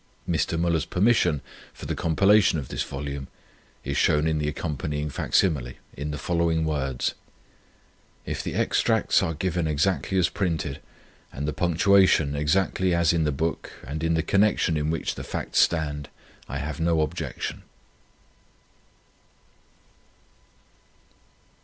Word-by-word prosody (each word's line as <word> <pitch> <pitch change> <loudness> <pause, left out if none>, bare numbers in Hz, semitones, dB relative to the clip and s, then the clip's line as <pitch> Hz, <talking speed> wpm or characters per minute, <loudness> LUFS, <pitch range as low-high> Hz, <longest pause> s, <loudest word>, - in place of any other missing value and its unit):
Mr. 80 0 0
Müller's 85 -2 +1
permission 90 - +2 0.3
for - - -9
the - - -2
compilation 95 +3 +3
of 70 -4 -5
this - - -3
volume 70 0 -5 0.6
is 70 +1 -3
shown 75 +2 +3
in 80 -1 +1
the 75 - -1
accompanying 75 -1 -3
facsimile, 70 -6 +1
(see - - -22
p. - - -27
2), - - -9
in 75 - -2
the 75 - -4
following 85 +1 0
words: 70 -5 -1 1.1
"If - - -3
the - - -5
extracts - - +2
are 80 - -1
given 85 0 -1
exactly 90 +5 0
as 90 - +4
printed, 80 -8 -2 0.5
and 70 +2 -4
the 75 - -1
punctuation 90 -3 +3
exactly 90 +4 +1
as 85 -1 +3
in 80 -2 +1
the 75 - +1
book 80 +4 -3
and 75 +3 -5
in 80 0 +2
the 80 - +1
connection 100 -5 +2
in 75 0 0
which 80 0 -1
the - - -7
facts - - -2
stand, 75 -3 +1 0.4
I 65 - -3
have 75 +3 -4
no 80 -1 +2
objection." 75 - -4
80 Hz, 140 wpm, -25 LUFS, 75-85 Hz, 1.1 s, as